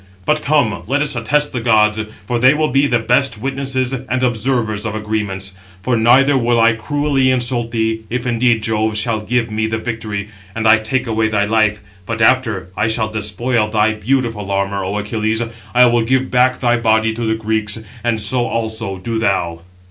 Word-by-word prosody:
But 150 Hz, 0 st, +1 dB
come, 140 Hz, -8 st, +1 dB
let 145 Hz, +4 st, +1 dB
us 150 Hz, -, 0 dB
attest 145 Hz, +5 st, 0 dB
the 125 Hz, -, -2 dB
gods; 110 Hz, -2 st, +3 dB, 0.3 s
for 120 Hz, +3 st, -1 dB
they 130 Hz, +4 st, +5 dB
will 155 Hz, 0 st, 0 dB
be 140 Hz, +1 st, +2 dB
the 120 Hz, -, +2 dB
best 125 Hz, +3 st, +1 dB
witnesses 135 Hz, 0 st, -1 dB
and 130 Hz, 0 st, -3 dB
observers 115 Hz, -3 st, 0 dB
of 110 Hz, -1 st, -3 dB
agreements. 105 Hz, -3 st, -3 dB, 0.3 s
For 125 Hz, +3 st, +1 dB
neither 130 Hz, +5 st, +4 dB
will 120 Hz, -1 st, +1 dB
I 115 Hz, 0 st, +5 dB
cruelly 135 Hz, +3 st, 0 dB
insult 120 Hz, -2 st, 0 dB
thee, 110 Hz, -1 st, -1 dB
if 125 Hz, +1 st, -3 dB
indeed 120 Hz, -2 st, +1 dB
Jove 110 Hz, -1 st, 0 dB
shall 110 Hz, +1 st, 0 dB
give 115 Hz, +1 st, -1 dB
me 110 Hz, +1 st, -1 dB
the 110 Hz, 0 st, -2 dB
victory, 110 Hz, -3 st, -5 dB, 0.3 s
and 115 Hz, 0 st, 0 dB
I 110 Hz, 0 st, +6 dB
take 125 Hz, +4 st, -1 dB
away 110 Hz, -1 st, 0 dB
thy 105 Hz, -1 st, +1 dB
life; 105 Hz, -1 st, +1 dB, 0.3 s
but 115 Hz, 0 st, -3 dB
after 115 Hz, -5 st, +2 dB
I 105 Hz, -, 0 dB
shall 110 Hz, -1 st, 0 dB
despoil 110 Hz, +2 st, -1 dB
thy 110 Hz, 0 st, +1 dB
beautiful 115 Hz, -2 st, -2 dB
armour, 100 Hz, 0 st, -1 dB
O 100 Hz, +3 st, -3 dB
Achilles, 110 Hz, +2 st, -1 dB, 0.3 s
I 125 Hz, 0 st, +7 dB
will 120 Hz, -1 st, +3 dB
give 130 Hz, +3 st, 0 dB
back 125 Hz, 0 st, +2 dB
thy 120 Hz, -1 st, +2 dB
body 110 Hz, -1 st, +2 dB
to 115 Hz, -, -6 dB
the 110 Hz, -, +1 dB
Greeks; 110 Hz, -1 st, +1 dB, 0.3 s
and 115 Hz, -2 st, 0 dB
so 120 Hz, +4 st, +1 dB
also 110 Hz, -3 st, -3 dB
do 115 Hz, +4 st, -3 dB
thou." 85 Hz, -6 st, -1 dB
115 Hz, 190 wpm, -17 LUFS, 110-125 Hz, 0.3 s, I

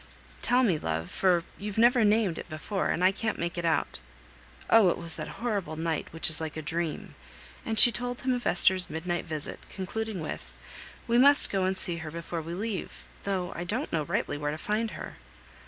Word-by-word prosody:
Tell 250 Hz, +1 st, +4 dB
me, 180 Hz, -10 st, +2 dB
love, 80 Hz, -, -3 dB
for 180 Hz, -3 st, +2 dB, 0.2 s
you've 205 Hz, 0 st, -5 dB
never 240 Hz, +1 st, +5 dB
named 210 Hz, -5 st, +2 dB
it -, -, -9 dB
before, 175 Hz, +5 st, -3 dB
and 180 Hz, -, 0 dB
I 185 Hz, -, +6 dB
can't 215 Hz, +2 st, -3 dB
make 170 Hz, 0 st, -3 dB
it 175 Hz, -1 st, -3 dB
out." 165 Hz, -, 0 dB, 0.7 s
"Oh! 225 Hz, -5 st, +6 dB
it -, -, 0 dB
was 165 Hz, -1 st, +2 dB
that -, -, -5 dB
horrible 200 Hz, -9 st, -3 dB
night 160 Hz, 0 st, -2 dB
which 165 Hz, -, 0 dB
is 160 Hz, 0 st, +5 dB
like 160 Hz, -1 st, -5 dB
a -, -, -3 dB
dream." 165 Hz, +1 st, -3 dB, 0.5 s
And 220 Hz, -, -1 dB
she 240 Hz, -, +9 dB
told 245 Hz, +1 st, -4 dB
him 255 Hz, 0 st, +1 dB
of 245 Hz, -1 st, -2 dB
Esther's 185 Hz, 0 st, +4 dB
midnight 175 Hz, +3 st, -3 dB
visit, 155 Hz, -2 st, -5 dB
concluding 210 Hz, +1 st, -4 dB
with, 155 Hz, -, -7 dB, 0.5 s
"We 235 Hz, 0 st, +3 dB
must 280 Hz, +2 st, +6 dB
go 195 Hz, -2 st, +1 dB
and 190 Hz, 0 st, 0 dB
see 175 Hz, -2 st, 0 dB
her 160 Hz, -1 st, -6 dB
before 170 Hz, +1 st, -5 dB
we 165 Hz, +2 st, -6 dB
leave, 205 Hz, -1 st, -5 dB, 0.2 s
though 190 Hz, -3 st, -2 dB
I 175 Hz, -, -4 dB
don't 225 Hz, -, -3 dB
rightly 150 Hz, -2 st, -1 dB
know -, -, -10 dB
where 145 Hz, -, -1 dB
to 150 Hz, -, -3 dB
find 215 Hz, +6 st, -1 dB
her." -, -, -8 dB
180 Hz, 205 wpm, -28 LUFS, 165-220 Hz, 0.7 s, she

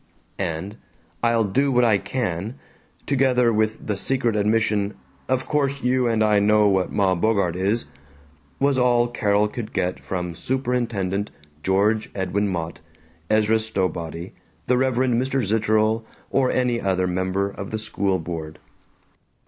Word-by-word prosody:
And 95 Hz, +3 st, -3 dB, 0.4 s
"I'll 115 Hz, -1 st, +3 dB
do 135 Hz, +8 st, +1 dB
what 125 Hz, -1 st, +3 dB
I 110 Hz, -4 st, +4 dB
can," 105 Hz, -2 st, -3 dB, 0.5 s
together 125 Hz, -3 st, +3 dB
with 110 Hz, 0 st, 0 dB
the 105 Hz, -, -1 dB
secret 120 Hz, +2 st, 0 dB
admission 105 Hz, -1 st, +1 dB, 0.3 s
"Of 130 Hz, 0 st, +1 dB
course 140 Hz, -2 st, 0 dB
you 125 Hz, 0 st, +2 dB
and 110 Hz, -2 st, +2 dB
I 105 Hz, -1 st, +4 dB
know 105 Hz, +1 st, +4 dB
what 95 Hz, -2 st, +1 dB
Ma 95 Hz, -2 st, +2 dB
Bogart 95 Hz, -2 st, +1 dB
is," 100 Hz, +6 st, 0 dB, 0.7 s
was 140 Hz, -1 st, +2 dB
all 120 Hz, -1 st, +3 dB
Carol 105 Hz, -3 st, +1 dB
could 110 Hz, +1 st, -6 dB
get 90 Hz, +1 st, -1 dB
from 90 Hz, -2 st, -4 dB
Superintendent 115 Hz, -4 st, -1 dB, 0.3 s
George 105 Hz, +4 st, +1 dB
Edwin 100 Hz, +2 st, 0 dB
Mott, 85 Hz, -3 st, -4 dB, 0.5 s
Ezra 110 Hz, +1 st, +3 dB
Stowbody, 90 Hz, -6 st, -3 dB, 0.3 s
the 125 Hz, -, +2 dB
Reverend 125 Hz, -1 st, +2 dB
Mr. 130 Hz, -2 st, 0 dB
Zitterel 110 Hz, +1 st, +2 dB, 0.3 s
or 130 Hz, -2 st, +2 dB
any 125 Hz, -2 st, +1 dB
other 95 Hz, -1 st, +1 dB
member 95 Hz, +2 st, -1 dB
of 100 Hz, 0 st, -7 dB
the 110 Hz, -, -3 dB
school 100 Hz, -3 st, -1 dB
board. 80 Hz, -2 st, -6 dB
110 Hz, 140 wpm, -23 LUFS, 95-120 Hz, 0.7 s, I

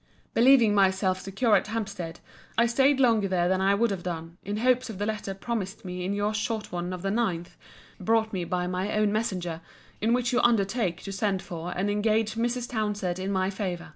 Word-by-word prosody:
Believing 240 Hz, -3 st, +6 dB
myself 190 Hz, -1 st, +2 dB
secure 210 Hz, +4 st, +2 dB
at -, -, +2 dB
Hampstead, 200 Hz, -6 st, -4 dB, 0.4 s
I 235 Hz, -, +5 dB
staid 265 Hz, +4 st, +3 dB
longer 225 Hz, -6 st, +4 dB
there 180 Hz, -2 st, +1 dB
than 185 Hz, +1 st, +1 dB
I 195 Hz, +1 st, +4 dB
would 230 Hz, +1 st, +2 dB
have 190 Hz, -3 st, -3 dB
done, 170 Hz, -1 st, -6 dB
in 205 Hz, +1 st, -4 dB
hopes 250 Hz, +2 st, +2 dB
of 215 Hz, -, -6 dB
the 205 Hz, -, -1 dB
letter 210 Hz, -2 st, -3 dB
promised 200 Hz, -2 st, -4 dB
me 180 Hz, 0 st, -4 dB
in 185 Hz, -, -1 dB
your 205 Hz, +1 st, 0 dB
short 215 Hz, 0 st, -2 dB
one 175 Hz, 0 st, -3 dB
of 180 Hz, 0 st, -6 dB
the 195 Hz, -, 0 dB
9th, 190 Hz, -7 st, -1 dB, 0.5 s
brought 220 Hz, +3 st, +1 dB
me 185 Hz, -2 st, -1 dB
by 180 Hz, +1 st, -1 dB
my 185 Hz, +3 st, -2 dB
own 215 Hz, -1 st, +3 dB
messenger, 180 Hz, -7 st, -2 dB, 0.4 s
in 220 Hz, +2 st, +2 dB
which 245 Hz, 0 st, +1 dB
you 245 Hz, -, +3 dB
undertake 210 Hz, -4 st, +1 dB
to 195 Hz, -, -5 dB
send 195 Hz, -1 st, -1 dB
for 170 Hz, 0 st, -6 dB
and 190 Hz, +3 st, 0 dB
engage 215 Hz, +1 st, +1 dB
Mrs. 240 Hz, +2 st, -1 dB
Townsend 210 Hz, -6 st, -2 dB
in 190 Hz, +1 st, -2 dB
my 190 Hz, 0 st, +1 dB
favour. 185 Hz, -3 st, -4 dB
200 Hz, 205 wpm, -27 LUFS, 185-225 Hz, 0.5 s, Believing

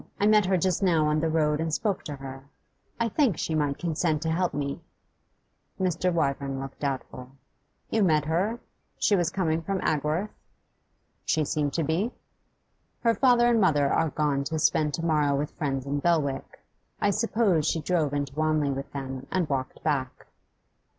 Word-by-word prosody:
I 205 Hz, -, +2 dB
met 210 Hz, -2 st, +5 dB
her 190 Hz, 0 st, +3 dB
just 180 Hz, +1 st, 0 dB
now 165 Hz, -5 st, +3 dB
on 150 Hz, 0 st, +2 dB
the 160 Hz, +1 st, 0 dB
road 150 Hz, -2 st, +1 dB
and 160 Hz, 0 st, -1 dB
spoke 200 Hz, +4 st, -1 dB
to 145 Hz, -, -5 dB
her. 135 Hz, 0 st, -9 dB, 0.5 s
I 230 Hz, -, +2 dB
think 235 Hz, -, +1 dB
she 160 Hz, -, -2 dB
might 145 Hz, -3 st, 0 dB
consent 160 Hz, -2 st, -1 dB
to 160 Hz, -, 0 dB
help 180 Hz, +2 st, +1 dB
me.' 140 Hz, -1 st, -3 dB, 1.0 s
Mr. 180 Hz, -1 st, +1 dB
Wyvern 140 Hz, -4 st, -1 dB
looked 135 Hz, 0 st, -7 dB
doubtful. 130 Hz, -2 st, -4 dB, 0.6 s
'You 220 Hz, -, +2 dB
met 155 Hz, -6 st, +3 dB
her? 190 Hz, +9 st, 0 dB, 0.4 s
She 205 Hz, -, +3 dB
was 175 Hz, -4 st, +1 dB
coming 165 Hz, -4 st, 0 dB
from 195 Hz, +3 st, -2 dB
Agworth?' 155 Hz, +7 st, 0 dB, 0.9 s
'She 155 Hz, -2 st, +1 dB
seemed 145 Hz, -1 st, -1 dB
to 165 Hz, -, 0 dB
be.' 165 Hz, +9 st, 0 dB, 0.9 s
'Her 230 Hz, -1 st, +3 dB
father 240 Hz, +1 st, +4 dB
and 235 Hz, -2 st, +3 dB
mother 145 Hz, -7 st, +3 dB
are 165 Hz, -, +2 dB
gone 145 Hz, -2 st, 0 dB
to 160 Hz, +2 st, -2 dB
spend 155 Hz, -1 st, +2 dB
to 165 Hz, -, -4 dB
morrow 150 Hz, -3 st, +2 dB
with 145 Hz, +2 st, -2 dB
friends 135 Hz, -4 st, -3 dB
in 140 Hz, +1 st, -1 dB
Belwick; 145 Hz, -4 st, -1 dB, 0.4 s
I 205 Hz, -, +2 dB
suppose 210 Hz, -6 st, +1 dB
she 165 Hz, -, +1 dB
drove 155 Hz, -2 st, 0 dB
into 140 Hz, -1 st, -2 dB
Wanley 155 Hz, -1 st, +1 dB
with 135 Hz, 0 st, -5 dB
them, 135 Hz, -2 st, -5 dB
and 180 Hz, -4 st, 0 dB
walked 135 Hz, -2 st, -3 dB
back. 135 Hz, -4 st, -2 dB
155 Hz, 175 wpm, -27 LUFS, 145-180 Hz, 1.0 s, met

